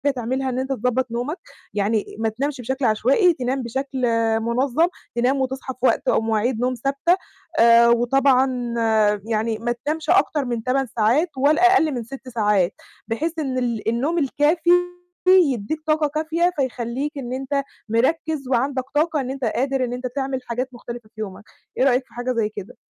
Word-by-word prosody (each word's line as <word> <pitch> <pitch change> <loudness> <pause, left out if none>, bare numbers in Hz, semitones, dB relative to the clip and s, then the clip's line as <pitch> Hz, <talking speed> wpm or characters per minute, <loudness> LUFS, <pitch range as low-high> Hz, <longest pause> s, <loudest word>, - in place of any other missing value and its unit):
تعملها 260 +2 -2
إن 255 0 -2
أنت 265 +1 -3
تضبّط 255 0 0
نومك، 250 +9 -3 0.4
يعني 210 +1 0
ما 225 - +1
تنامش 270 +4 -3
بشكل 265 +2 -2
عشوائي، 260 - +3
تنام 260 -2 -2
بشكل 265 +2 -4 0.4
منظّم 255 +8 +1 0.3
تنام 255 +3 +1
وتصحى 265 0 -3
في 255 - -30
وقت - - +1
أو - - +3
مواعيد 225 +2 0
نوم 250 +1 +1
ثابتة، 275 +8 +1 0.4
آآ، 235 0 +7
وطبعًا 250 0 +2 0.5
يعني 220 0 -1
ما 240 +1 -1
تنامش 310 +1 -2
أكتر 320 -6 +3
من 240 -2 -3
8 260 +2 0
ساعات 245 +10 +2
ولا 310 +7 +4
أقل 320 -5 +3
من 245 -4 -3
6 260 +3 -10
ساعات، 205 -5 +1 0.3
بحيث 320 +9 -2
إن 265 -4 -2
ال 235 -3 -1
النوم 270 +9 0
الكافي 305 +3 +1 0.6
يدّيك 310 - +3
طاقة 310 -1 +2
كافية 320 +4 0
فيخلّيك 260 +2 -2
إن 250 -2 -5
أنت 270 +2 -1 0.3
مركّز 275 +4 0
وعندك 265 +1 0
طاقة 305 0 +2
إن 260 0 -4
أنت 270 0 -6
قادر 265 +4 0
إن 245 -1 -2
أنت 250 +1 -4
تعمل 270 -1 -2
حاجات 245 +2 -2
مختلفة 235 -2 -9
في 220 - -7
يومك، 195 -2 -7 0.3
إيه - - +3
رأيك 260 -1 +3
في - - -24
حاجة 245 +1 -2
زي 225 -3 0
كده؟ 215 +2 -9
260 Hz, 170 wpm, -22 LUFS, 235-280 Hz, 0.6 s, آآ